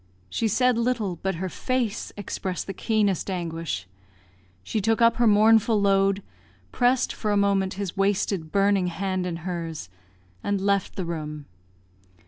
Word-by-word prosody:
She 225 - 0
said 250 +2 +2
little, 230 -7 0
but 190 +2 -2
her 185 +3 -3
face 245 +2 -2
expressed 190 -2 -4
the 195 - -5
keenest 205 -2 0
anguish; 165 - -3 0.8
she 215 - -2
took 225 +2 +1
up 230 0 +4
her 240 -1 +4
mournful 215 +1 +5
load, 195 0 +2 0.5
pressed 250 0 +2
for 215 - -3
a 205 - +2
moment 195 -2 +1
his 195 -2 -4
wasted, 195 -4 0
burning 200 -2 +3
hand 185 +1 -2
in 175 - -3
hers, 165 - -4 0.5
and 200 -1 0
left 200 -1 0
the 185 - -3
room. 150 -3 -5
195 Hz, 145 wpm, -25 LUFS, 180-215 Hz, 0.8 s, mournful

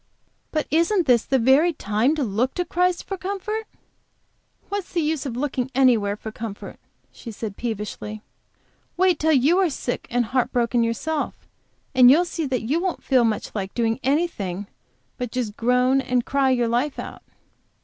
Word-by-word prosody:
"But 310 -2 -1
isn't 335 +4 +2
this 240 -4 +3
the 270 - +2
very 270 +8 +4
time 225 +4 +1
to 300 - -1
look 240 +4 -1
to 355 - -1
Christ 360 0 0
for 390 - -5
comfort?" 405 +3 -3 1.0
"What's 405 -2 -4
the 345 - +1
use 305 -2 -1
of 240 -2 -5
looking 265 -2 -2
anywhere 230 -6 +3
for 220 +1 -8
comfort?" 220 -2 -8 0.3
she 235 - -10
said, 215 -2 -6
peevishly. 215 -1 -5 0.7
"Wait 365 -3 +3
till 320 +1 +2
you 295 +7 +4
are 375 -3 +3
sick 250 -3 -4
and 240 0 +1
heart 255 +2 0
broken 240 0 +1
yourself, 290 +7 -3 0.5
and 255 -2 +7
you'll 325 +7 +5
see 330 -3 -3
that 255 -3 -1
you 280 +9 0
won't 370 -2 -2
feel 260 -3 +3
much 220 -2 -1
like 195 -2 -4
doing 225 -1 0
anything 250 - -1 0.5
but 245 -2 -3
just 235 -5 -3
groan 250 +3 +2
and 250 -2 0
cry 275 -1 +2
your 245 -2 +2
life 245 +5 0
out." - - -7
255 Hz, 170 wpm, -23 LUFS, 230-315 Hz, 1.0 s, and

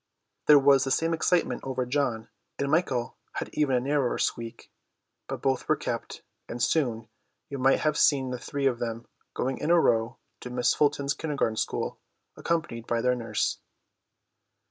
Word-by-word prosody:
There 150 - +9
was 135 -1 +5
the 135 - -2
same 165 +5 +1
excitement 170 +2 +1
over 130 -1 -2
John, 125 -4 -1 0.3
and 140 0 -1
Michael 135 -7 0 0.2
had - - -4
even 145 -4 +2
a - - +3
narrower 135 0 0
squeak; 115 -1 -3 0.6
but - - -6
both 135 -1 0
were - - +5
kept, - - -5 0.3
and 120 - -5
soon, 120 -6 0 0.4
you 140 -1 -5
might 135 +1 +3
have 155 -1 +1
seen 135 -3 +3
the 125 - -4
three 140 +3 -3
of 125 -3 +2
them 115 -1 -4 0.3
going 130 +1 -2
in 150 - -2
a 175 0 +6
row 115 -6 +2 0.2
to 125 - -8
Miss 125 0 +2
Fulsom's 145 -1 +1
Kindergarten 145 -8 -1
school, - - -2 0.4
accompanied 155 -9 -2
by 120 - 0
their 125 +1 +2
nurse. 115 -3 -1
135 Hz, 165 wpm, -27 LUFS, 120-145 Hz, 0.6 s, There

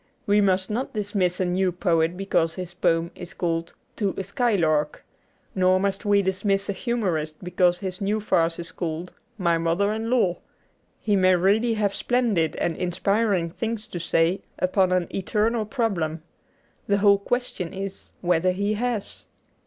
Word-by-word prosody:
We 205 +1 +4
must 190 0 +1
not 240 +2 -3
dismiss 200 -4 0
a 185 - +1
new 180 +1 +1
poet 170 -1 +1
because 170 -4 0
his 180 -2 -6
poem 170 -1 +1
is 175 - -10
called 165 -1 -2
' - - -42
To 200 -3 -1
a 195 - -2
Skylark 180 -8 0 0.2
'; - - -40
nor 185 0 +3
must 200 +3 -1
we 205 -1 +4
dismiss 195 +1 0
a - - +1
humorist 180 -10 -1
because 180 0 +2
his 185 -1 -5
new 205 +2 0
farce 165 -5 +1
is 170 +1 -4
called 170 0 -4 0.2
' - - -41
My 170 -1 +3
Mother 170 +5 +1
in 220 +1 -3
Law.' 230 -8 +2 0.6
He 210 -2 +1
may 185 -1 +5
really 210 +6 +2
have 205 -2 0
splendid 225 -11 +1
and 170 -2 -1
inspiring 185 0 0
things 225 +3 -3
to 175 - -5
say 165 +2 +1 0.2
upon 185 0 +2
an 180 -1 +2
eternal 215 +3 0
problem. 180 - -1 0.6
The 200 - +3
whole 200 0 +5
question 200 -5 -2
is 195 0 -7
whether 180 +1 +2
he 200 +3 0
has. 230 -1 -3
190 Hz, 170 wpm, -24 LUFS, 175-210 Hz, 0.6 s, may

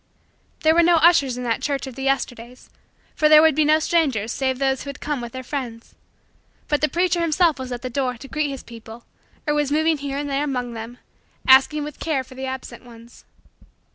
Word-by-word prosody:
There 315 0 +5
were 340 - +5
no 345 0 +4
ushers 315 -6 +4
in 250 - -5
that 230 -2 -1
church 280 -1 -2
of 265 - -8
the 270 - -9
Yesterdays 250 -3 -3 0.4
for 305 -2 +2
there 305 0 +8
would 320 -1 +5
be 310 +2 +2
no 305 +1 +4
strangers 285 -10 0
save 260 -1 -1
those 265 -1 0
who 280 - -7
would 280 - -8
come 295 -4 -3
with 235 -1 -7
their 260 +1 -7
friends; 245 -4 -6 0.7
but 295 - 0
the 305 - +2
preacher 350 0 +1
himself 330 -2 +2
was 260 -1 -6
at 245 0 -5
the - - -3
door 255 -1 -2
to 270 - -11
greet 305 +1 -2
his 275 -2 -7
people 230 0 -12 0.4
or 295 - +1
was 295 -1 0
moving 315 0 +2
here 280 0 -4
and 290 0 -3
there 280 +1 -1
among 250 -4 -3
them, 230 +2 -8 0.5
asking 270 +3 +5
with 295 -1 -8
care 295 -5 -1
for 260 - -15
the 265 +1 -6
absent 260 0 -7
ones. 235 -1 -16
275 Hz, 220 wpm, -22 LUFS, 250-305 Hz, 0.7 s, there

